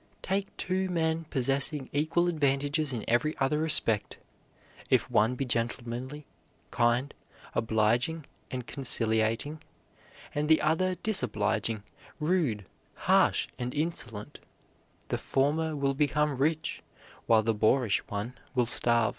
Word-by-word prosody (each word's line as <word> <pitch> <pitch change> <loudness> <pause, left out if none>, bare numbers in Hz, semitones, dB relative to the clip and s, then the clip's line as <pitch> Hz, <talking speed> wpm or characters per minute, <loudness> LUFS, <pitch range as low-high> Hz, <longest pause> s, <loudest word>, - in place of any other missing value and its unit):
Take 195 +1 -2
two 185 +1 -1
men 165 -2 0
possessing 135 0 0
equal 155 +4 +1
advantages 145 -1 0
in 120 -4 -4
every 140 +7 +1
other 135 +3 +1
respect; 130 -9 +1 0.7
if - - +2
one 115 +4 +3
be 135 - -2
gentlemanly, 120 +4 -3 0.5
kind, 120 +4 +1 0.4
obliging, 115 +8 +1 0.2
and 125 -2 -5
conciliating, 115 +2 +2 0.7
and 150 +1 -1
the 160 - +6
other 180 +4 +1
disobliging, 110 - 0 0.4
rude, 150 - 0 0.3
harsh, - - +2
and 125 +2 -4
insolent, 145 -9 -4 0.7
the - - -1
former 155 +4 0
will 140 -1 0
become 150 +1 +1
rich 155 +4 -1 0.5
while 110 -1 +5
the 115 +1 +1
boorish 110 +1 +2
one 105 +4 -4 0.2
will 125 -2 +3
starve. 115 -1 +3
135 Hz, 115 wpm, -29 LUFS, 115-155 Hz, 0.7 s, the